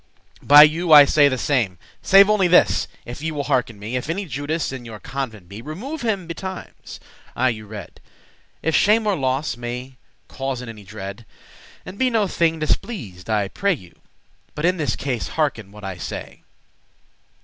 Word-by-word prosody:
By 145 +1 +9
you 160 +3 +2
I 145 -2 +10
say 145 0 +4
the 130 -2 0
same. 120 -9 0 0.2
Save 195 0 +7
only 210 -3 +3
this, 175 - +4 0.2
if 125 +3 -8
ye 160 - -2
will 145 -2 -3
hearken 125 -6 0
me, 105 +5 -6
If 125 +4 -3
any 195 +4 -2
Judas 145 +1 -3
in 130 -2 -7
your 110 -2 -9
convent 120 -9 -6
be, 100 +4 -9
Remove 220 - -6
him 210 -6 -1
betimes, 185 +3 -8 0.4
I 130 +1 +2
you 110 -3 -5
rede,* 100 -5 -10
*counsel - - -33
If 160 - +1
shame 215 +2 +4
or 205 -2 +2
loss 135 -1 -1
may 125 +2 -6 0.3
causen 130 -2 -5
any 110 -2 -10
dread. 100 +2 -8 0.6
And 185 +2 -10
be 260 - +3
no 225 -4 +2
thing 165 -2 +1
displeased, 140 - -3
I 105 -2 +2
you 100 - -6
pray; 170 - -2 0.6
But 150 - -2
in 180 +1 +2
this 145 -8 -1
case 130 -4 -3
hearken 130 -10 -2
what 105 0 -13
I 95 -2 -5
say. - - -7
140 Hz, 180 wpm, -21 LUFS, 115-170 Hz, 0.6 s, I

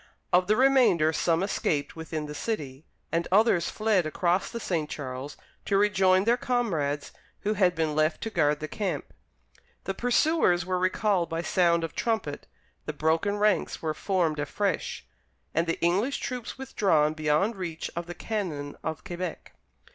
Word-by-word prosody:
Of 180 0 +4
the 215 - +4
remainder 245 -12 +4
some 165 +2 +1
escaped 155 -7 -1
within 160 -1 -4
the 150 - -7
city, 150 -6 -4 0.3
and 165 0 0
others 195 -3 +4
fled 210 -6 +1
across 175 +4 0
the 235 - -5
St. 165 -8 -2
Charles 135 0 -6 0.3
to 195 - +2
rejoin 190 -2 +4
their 235 +3 +3
comrades 165 - -1 0.3
who 210 +1 0
had 185 -4 +3
been 160 -2 0
left 155 +1 +2
to 225 - -4
guard 150 -5 +2
the 155 - -3
camp. 180 -5 -3 0.7
The 195 - -2
pursuers 245 - +2
were 185 -1 -1
recalled 185 -1 +1
by 165 +1 -2
sound 170 -2 +2
of 165 - -4
trumpet, 220 -11 -2 0.4
the 150 - -2
broken 160 +7 +1
ranks 210 -4 +1
were 155 -1 0
formed 165 -3 0
afresh, 180 +5 -2 0.5
and 165 +2 +1
the 165 - -1
English 195 +11 +1
troops 250 -3 -5
withdrawn 175 - +2
beyond 155 +8 +1
reach 170 -4 -5
of 170 0 -4
the 175 - -7
cannon 175 -9 -4
of 160 -1 -4
Quebec. 180 -4 -6
175 Hz, 160 wpm, -27 LUFS, 155-205 Hz, 0.7 s, Of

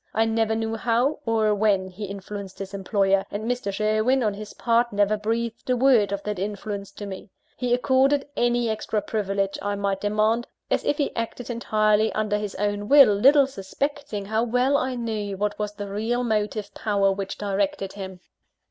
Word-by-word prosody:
I 225 - +3
never 225 0 +1
knew 225 0 -2
how, 245 +6 +1
or 220 -2 +2
when, 200 -2 +2
he 190 +3 -7
influenced 200 0 -7
his 195 0 -7
employer, 195 0 +1
and 205 +1 -4
Mr. 245 -4 -1
Sherwin 215 +5 +1
on 210 -2 +1
his 210 +1 -9
part, 235 0 +2
never 205 +1 +2
breathed 230 +3 -3
a 250 - +3
word 240 -6 +4
of 200 0 -3
that 210 -3 -3
influence 200 0 -4
to 205 - -7
me. 195 0 -8 0.3
He 250 -2 -2
accorded 270 +3 +3
any 240 0 +1
extra 220 0 -1
privilege 195 -2 -1
I 205 0 -1
might 200 -1 -1
demand, 215 +3 +1 0.2
as - - +1
if 290 - +1
he 290 - -1
acted 230 +1 -4
entirely 215 -2 +2
under 210 -1 0
his 210 -2 -5
own 205 +1 -2
will, 280 -7 +8
little 275 +7 +6
suspecting 265 -1 -4
how 220 +2 0
well 250 +4 +2
I 260 -2 0
knew 215 -4 -3
what 210 +2 -2
was 210 0 -2
the 205 -1 -6
real 225 +5 -1
motive 210 -2 -1
power 200 -2 +1
which 195 0 -4
directed 195 -1 -1
him. 190 -2 -8
215 Hz, 185 wpm, -24 LUFS, 200-235 Hz, 0.3 s, will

